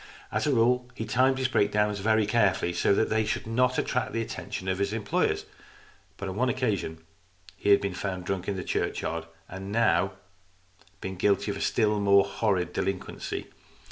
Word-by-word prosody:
As - - 0
a - - +3
rule 125 0 +2
he 110 - -4
timed 130 +4 +3
his 130 0 +1
breakdowns 105 -3 +1
very 110 +1 +3
carefully, 100 -5 +2
so - - +2
that 110 - +2
they 110 0 +2
should 110 - -2
not 125 +3 +1
attract 125 -2 -1
the 115 - 0
attention 95 -3 -6
of 95 0 0
his 100 +1 0
employers. 110 -3 0 0.7
But 100 - -5
on 95 - -4
one 125 +2 +2
occasion 100 -10 -2 0.5
he 95 - -2
had 100 - +6
been 100 -1 -2
found 95 -1 -4
drunk 95 0 -3
in 100 - -1
the 90 - -4
churchyard, 80 0 -2 0.2
and 95 +1 -8
he 100 - -5
had 115 - +4
now 95 0 +2 0.9
been 95 0 -5
guilty 100 +2 +2
of 100 - -5
a - - -6
still 105 -2 +2
more 100 -1 +5
horrid 95 -4 0
delinquency. 95 -1 -3
100 Hz, 190 wpm, -27 LUFS, 95-115 Hz, 0.9 s, had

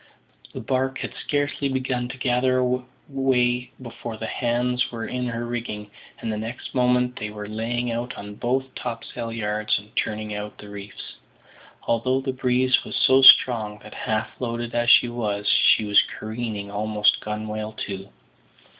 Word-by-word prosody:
The - - -4
barque 130 0 0
had - - -5
scarcely 145 -1 -1
begun 130 -2 -1
to 125 - -7
gather 125 0 +2 0.3
way 125 -3 +1
before 120 -2 -7
the 110 - -5
hands 125 +1 0
were 115 -1 -4
in 125 0 -3
her 115 0 -3
rigging, 115 -3 -5 0.3
and 110 - -3
next 115 +3 -6
moment 125 0 +2
they 105 - -3
were 105 -1 -7
laying 120 +3 -2
out 120 +2 -3
on 105 0 -7
both 130 +4 -1
topsail 115 -1 -5
yards 105 -1 0
and 105 +2 -12
turning 105 0 -2
out 105 0 -6
the 105 - -11
reefs; 100 0 -9 0.7
although 130 +3 +1
the 135 0 -3
breeze 130 0 +2
was - - -6
so 130 +1 +5
strong 110 -5 +7
that, - - -11
half 110 0 -2
loaded 120 -1 -3
as 120 0 +2
she 120 - +7
was, 105 -4 -2
she 110 - +5
was 105 -2 +6 0.2
careening 110 -2 -4
almost 105 0 +2
gunwale 105 0 -4
to. 95 -1 -6
120 Hz, 155 wpm, -24 LUFS, 105-125 Hz, 0.7 s, strong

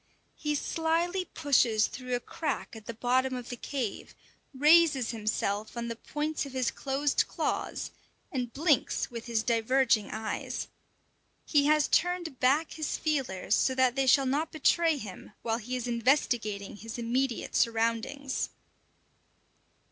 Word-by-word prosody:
He 300 -1 -1
slyly 335 +5 0
pushes 255 -10 +2
through 255 -1 -4
a - - -1
crack 295 -1 -4
at 220 -1 -11
the 230 - -4
bottom 255 +3 +1
of 245 -1 -6
the 245 - -4
cave, 245 -3 -4 0.4
raises 295 -3 +5
himself 215 -1 -2
on 235 0 -3
the 230 - -3
points 300 +5 -3
of 275 -2 -8
his 255 -2 0
closed 275 +1 0
claws, - - -2 0.4
and 250 -3 -2
blinks 295 -2 +1
with 235 0 -7
his 225 -2 0
diverging 235 -2 +2
eyes. 220 0 -4 0.8
He 290 -2 +3
has 305 -1 +4
turned 350 -6 0
back 285 +6 +3
his 310 -2 -2
feelers 270 - -1
so 260 - +3
that 255 -1 +3
they 270 -1 +1
shall 270 +2 +5
not 290 +5 0
betray 325 0 +3
him 210 -4 -9
while 225 0 0
he 245 +3 -4
is 250 -1 -3
investigating 235 -5 0
his 225 +2 -7
immediate 240 +1 -1
surroundings. 230 +4 0
255 Hz, 140 wpm, -29 LUFS, 230-295 Hz, 0.8 s, raises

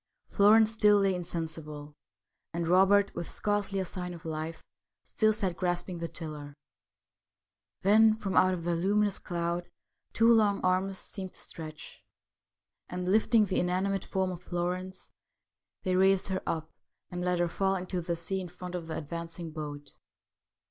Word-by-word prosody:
Florence 215 +2 +6
still 210 -2 +5
lay 195 -1 +3
insensible, 160 -4 -5 0.6
and 170 -1 -1
Robert, 195 +3 +5
with 170 -1 -5
scarcely 205 -1 -1
a 190 - -1
sign 180 0 -5
of 165 +1 -13
life, 160 +1 -4 0.4
still 215 -1 +2
sat 195 -5 -2
grasping 175 0 -2
the 170 - -3
tiller. 150 -4 -7 1.3
Then 215 +2 +6
from 200 -3 -4
out 185 0 +5
the 175 0 0
luminous 205 +4 +1
cloud 170 0 -3 0.4
two 230 +1 +5
long 210 -3 +3
arms 185 +1 +1
seemed 190 -2 -6
to - - -12
stretch, 155 -2 -9 0.9
and, 180 +1 -2
lifting 220 +1 +4
the 190 - 0
inanimate 190 +2 0
form 190 -1 -1
of 175 -1 -7
Florence, 180 +1 -4 0.7
they 185 -1 +1
raised 190 +1 +3
her 190 - -1
up, 160 -1 -3 0.4
and 180 0 -3
let 180 0 +1
her 175 0 +2
fall 195 +3 0
into 180 -1 -3
the 170 0 -2
sea 180 +3 -2
in 180 - -6
front 180 +1 -9
of 175 -2 -4
the 160 - -4
advancing 165 +1 -6
boat. 145 -2 -7
180 Hz, 155 wpm, -30 LUFS, 170-195 Hz, 1.3 s, Florence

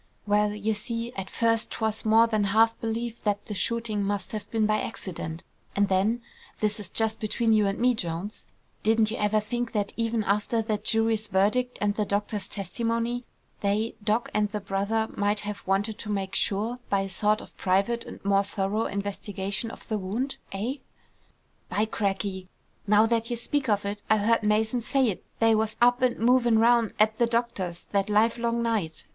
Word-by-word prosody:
"Well, 210 0 +3
you 210 +1 0
see, 230 +3 -4
at 195 -3 -5
first 230 -1 +1
'twas 220 -1 -2
more 220 +1 +6
than 215 -3 +1
half 225 +3 +4
believed 230 +1 -3
that 205 -1 0
the 210 - -5
shooting 225 0 -1
must 200 -1 -2
have 215 -2 -5
been 220 -2 +1
by 215 0 +2
accident; 165 -6 -5 0.3
and 200 -1 +2
then, 210 +5 +1 0.4
this 215 0 0
is 200 -3 -6
just 220 -1 0
between 225 +1 +1
you 210 -2 +4
and 195 - -1
me, 250 +1 +3
Jones; 180 0 -4 0.3
didn't 220 0 +3
you 230 - -3
ever 210 +1 +2
think 240 +2 -3
that 205 -2 -1
even 230 -1 0
after 210 +4 +1
that 215 -1 -2
jury's 225 -1 +2
verdict, 215 +7 +1
and 205 0 +1
the 210 - 0
doctor's 205 0 -2
testimony, 230 +5 -2 0.3
they, 210 +3 0
Doc. 215 +3 0
and 210 0 +1
the 210 0 -3
brother, 200 +3 -1
might 205 0 +1
have 205 -1 -5
wanted 205 +3 0
to 215 - -6
make 195 -2 -2
sure, 215 +6 0
by 200 -1 +2
a 195 - -3
sort 210 +3 +1
of - - -13
private 200 +6 +1
and - - -11
more 200 0 +4
thorough 200 +2 -1
investigation 200 +1 -3
of - - -12
the 215 -2 -1
wound, 225 +9 -2
eh?" 225 +8 -2 0.9
"By 210 - +1
crackey! 195 -3 -2 0.4
Now 210 +2 +6
that 230 0 0
you 240 - -1
speak 265 +2 -1
of 205 -1 +1
it, 205 +1 -3
I 220 - +5
heard 225 +3 +2
Mason 220 +3 +1
say't 245 -5 +1 0.2
they 225 0 +5
was 220 0 +1
up 245 +1 +4
an' 255 -1 +2
movin' 240 0 +4
round 230 0 +4
at 215 +1 +3
the 235 - +4
doctor's 230 -7 -2
that 200 0 +1
livelong 235 +2 +2
night! 210 -9 -1
215 Hz, 185 wpm, -27 LUFS, 200-230 Hz, 0.9 s, more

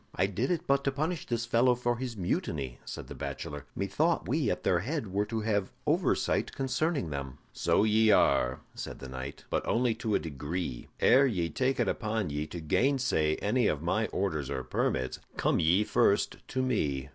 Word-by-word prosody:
"I 95 - +3
did 100 +6 -1
it 175 -3 -1
but 140 0 +2
to 140 - +2
punish 155 +4 -2
this 120 -1 -1
fellow 120 +1 +4
for 120 0 -1
his 125 -2 -5
mutiny," 70 -7 -2
said - - -6
the - - -7
bachelor. 75 -1 -6
"Methought - - 0
we - - +1
at - - -2
their 90 - +3
head 115 - -3
were 100 +1 +1
to 110 0 -2
have 105 -3 0
oversight - - +1
concerning 135 - -1
them." 70 -2 -5 0.2
"So - - +2
ye 110 +1 +4
are," 65 -10 +3
said - - -6
the 65 - -8
knight; 65 +2 -7
"but - - +1
only 120 0 +2
to 110 -2 -1
a - - +3
degree. 75 -2 -4
Ere 135 +3 +6
ye 90 -9 -1
take 130 0 0
it 120 - +2
upon 110 -5 -1
ye 75 +1 -2
to 85 +3 -6
gainsay 115 - +2
any 115 +2 +2
of 75 +1 -1
my 110 +6 +1
orders 80 -8 -2
or 65 -2 -3
permits, 65 0 -1 0.2
come - - +2
ye 85 +5 +4
first 105 -2 +2
to 130 -1 -1
me. 70 - -1
105 Hz, 190 wpm, -30 LUFS, 75-125 Hz, 0.2 s, Ere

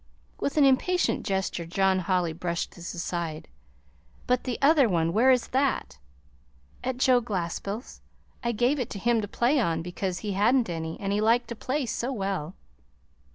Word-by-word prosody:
With 280 - -2
an 290 - +6
impatient 345 +7 +2
gesture 190 -3 -2
John 190 +2 +2
Holly 180 -2 0
brushed 170 +1 -3
this 170 +1 -7
aside. 170 -2 -4 0.8
"But 250 0 +1
the 250 -3 -2
other 280 -4 +5
one 165 -2 +1
where 235 +6 +4
is 255 -2 +3
that?" 260 - 0 0.8
"At 255 0 -2
Joe 255 -1 +4
Glaspell's. 200 +1 -4 0.4
I 235 - +1
gave 245 +6 +1
it 245 - -2
to - - -6
him 235 +2 +2
to 205 - -4
play 245 +7 +2
on, 165 -8 0
because 180 +1 -3
he 210 0 -4
had 205 +6 +3
n't 240 -8 +1
any, 160 -1 -4
and 200 0 -2
he 210 - +1
liked 230 +3 +2
to 235 - -4
play 265 +5 -2
so 240 +2 -2
well." 195 - -3
210 Hz, 175 wpm, -27 LUFS, 175-250 Hz, 0.8 s, an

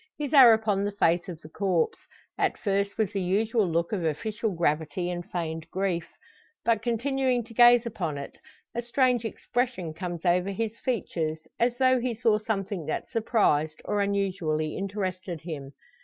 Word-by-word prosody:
His 295 -1 -4
are 260 -5 +10
upon 215 -3 +2
the 205 - -1
face 175 -2 +2
of 170 -3 -7
the 155 - -12
corpse 180 -2 0 0.4
at - - 0
first 200 -1 -1
with 220 -4 0
the 195 - -1
usual 210 +3 +1
look 170 0 0
of 195 -5 -1
official 215 +8 -1
gravity 165 +1 -1
and 175 0 -4
feigned 160 -2 -4
grief. 185 -3 -1 0.6
But 230 -2 +2
continuing 250 +1 0
to 230 +1 -14
gaze 240 0 +7
upon 175 -10 -3
it, 140 - -7 0.4
a 240 - -2
strange 245 -1 +1
expression 235 -7 -2
comes 175 0 -5
over 180 +2 +2
his 220 +3 -3
features, 160 -10 -2
as 240 +1 +2
though 255 -1 +4
he 240 -1 -2
saw 220 -1 +2
something 195 -6 -3
that 155 - -3
surprised, 205 - +1
or 205 - 0
unusually 185 -6 -1
interested 185 -4 -4
him. 145 -5 -7
200 Hz, 165 wpm, -27 LUFS, 170-230 Hz, 0.6 s, are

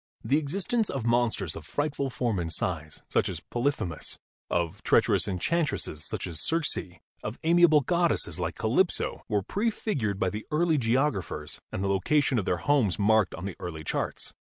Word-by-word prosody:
The 145 +3 +3
existence 195 +9 0
of 130 -4 -3
monsters 115 -7 +1
of 80 - -7
frightful 145 - -2
form 120 -6 -1
and 85 -1 -2
size, 80 -4 -3
such - - +1
as - - -4
Polyphemus; 120 - -2 0.3
of 85 -2 -1
treacherous - - +3
enchantresses, 100 - -1
such - - -3
as 85 -4 -3
Circe; 165 -2 +1 0.5
of 110 +3 -5
amiable 165 -2 +6
goddesses, 165 - 0
like 85 -1 -2
Calypso, 135 +12 +1
were 105 -3 +1
prefigured 195 - -1
by 115 - +1
the 105 +1 -6
early 160 0 +2
geographers 115 - 0
and 95 - -3
the - - +1
location 125 +7 +2
of 100 - -3
their 90 - +1
homes 120 -2 +2
marked 110 -1 +3
on 90 - -7
the 100 - -4
early 80 -3 -6
charts. - - -3
115 Hz, 165 wpm, -28 LUFS, 90-150 Hz, 0.5 s, amiable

